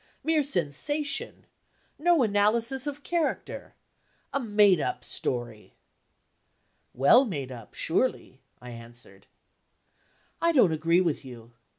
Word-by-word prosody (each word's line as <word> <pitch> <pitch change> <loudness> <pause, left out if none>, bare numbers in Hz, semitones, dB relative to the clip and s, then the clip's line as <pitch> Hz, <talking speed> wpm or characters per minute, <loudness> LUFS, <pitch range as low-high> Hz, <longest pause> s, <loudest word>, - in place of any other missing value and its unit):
"Mere 320 -1 +2
sensation. 280 - -1 0.5
No 335 -2 +3
analysis 230 +6 +1
of 290 0 -6
character. 340 -3 -3 0.6
A 280 - 0
made 205 - +3
up - - -3
story!" 120 -4 -4 1.2
"Well 140 - +5
made 145 - -5
up, 115 -4 -11
surely?" - - -1 0.2
I 125 0 -10
answered. 115 -4 -14 1.1
"I 335 0 +2
don't 230 - +4
agree 165 +3 +2
with 165 -4 -1
you." 120 -3 -12
200 Hz, 105 wpm, -27 LUFS, -, 1.2 s, Well